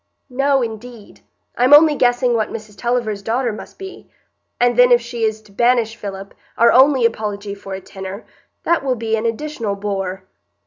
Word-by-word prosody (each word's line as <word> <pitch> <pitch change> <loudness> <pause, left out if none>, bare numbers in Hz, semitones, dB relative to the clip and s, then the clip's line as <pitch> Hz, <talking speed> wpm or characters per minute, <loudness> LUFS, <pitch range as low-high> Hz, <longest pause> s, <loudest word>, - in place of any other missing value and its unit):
"No, 275 +1 +1
indeed; 225 -1 -9 0.3
I'm 255 +4 +6
only 305 0 +6
guessing 245 -1 +2
what 220 -2 0
Mrs 215 -2 -9
Tulliver's 235 -2 -2
daughter 235 +3 -1
must 215 - -11
be; 385 -1 -10 0.5
and 245 0 +2
then 245 +1 +5
if 240 - +6
she 235 0 -7
is 220 0 -2
to 210 - -20
banish 235 +1 +1
Philip, 195 -3 -8 0.2
our 235 0 +5
only 265 -1 +5
apology 210 -3 -2
for 195 -1 -8
a 190 - -8
tenor, 190 +2 -9 0.4
that 340 -4 +1
will 260 -2 0
be 225 -1 -1
an 225 +1 -1
additional 230 -4 -3
bore." 195 -2 -4
230 Hz, 175 wpm, -19 LUFS, 210-250 Hz, 0.5 s, I'm